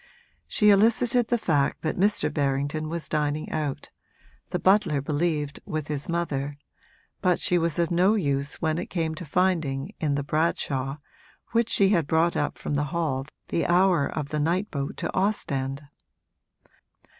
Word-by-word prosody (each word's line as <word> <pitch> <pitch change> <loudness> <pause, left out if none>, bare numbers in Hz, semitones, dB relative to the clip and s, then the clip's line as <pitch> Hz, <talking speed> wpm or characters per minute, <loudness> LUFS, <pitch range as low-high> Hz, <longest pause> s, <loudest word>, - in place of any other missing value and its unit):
She 210 -1 +4
elicited 230 +3 +3
the 240 - +2
fact 150 -10 0
that 155 - -1
Mr. 205 +3 +1
Berrington 145 +2 -1
was 165 -2 -4
dining 150 0 -1
out 150 -3 -3 0.6
the - - -1
butler 190 -7 +3
believed 150 0 -1
with 155 -5 -4
his 145 0 -3
mother 145 -4 -2 0.6
but 180 -2 +2
she 180 - +2
was 165 -2 -1
of 170 -1 +1
no 185 +5 +4
use 140 -7 0
when 160 0 0
it 180 - -4
came 165 -3 -1
to 170 +2 -7
finding 160 -1 0
in 150 -3 0
the 140 - -1
'Bradshaw' 140 -3 -1 0.5
which 230 0 +2
she 195 -3 +4
brought 160 +3 +1
up 145 - -1
from - - -4
the 145 +1 +1
hall 140 -4 -2 0.2
the 165 - 0
hour 175 -4 +3
of 150 -2 -4
the 150 - -2
night 175 +7 0
boat 140 -1 -4
to - - -3
Ostend. 140 -9 -1
155 Hz, 155 wpm, -26 LUFS, 145-180 Hz, 0.6 s, She